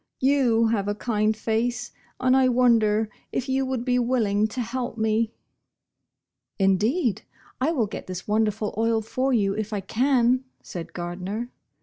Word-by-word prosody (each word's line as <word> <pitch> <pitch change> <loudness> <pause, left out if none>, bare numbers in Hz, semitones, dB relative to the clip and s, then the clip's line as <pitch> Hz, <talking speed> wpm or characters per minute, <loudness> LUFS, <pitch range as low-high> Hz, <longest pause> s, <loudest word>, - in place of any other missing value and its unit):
You 250 -5 +3
have 205 -3 0
a 205 - 0
kind 215 -1 0
face, 235 +2 -1 0.3
and 255 0 +3
I 265 -1 +5
wonder 225 -4 +3 0.2
if 255 - -2
you 265 0 0
would 255 -2 -2
be 250 -1 +2
willing 220 -4 +1
to 235 +4 -7
help 240 0 -3
me?" 220 0 +1 0.6
" - - -59
Indeed 220 - +1 0.4
I 290 +5 +2
will 245 -10 +1
oret 205 - -7
this 185 -1 -6
wonderful 215 0 0
oil 225 -1 +2
for 260 +5 -1
vou 200 -5 +2
if 215 0 -3
I 205 -2 -2
can," 250 +4 +2 0.2
said 170 -2 -7
Gardner. 185 +7 -4
225 Hz, 155 wpm, -25 LUFS, 210-250 Hz, 0.6 s, I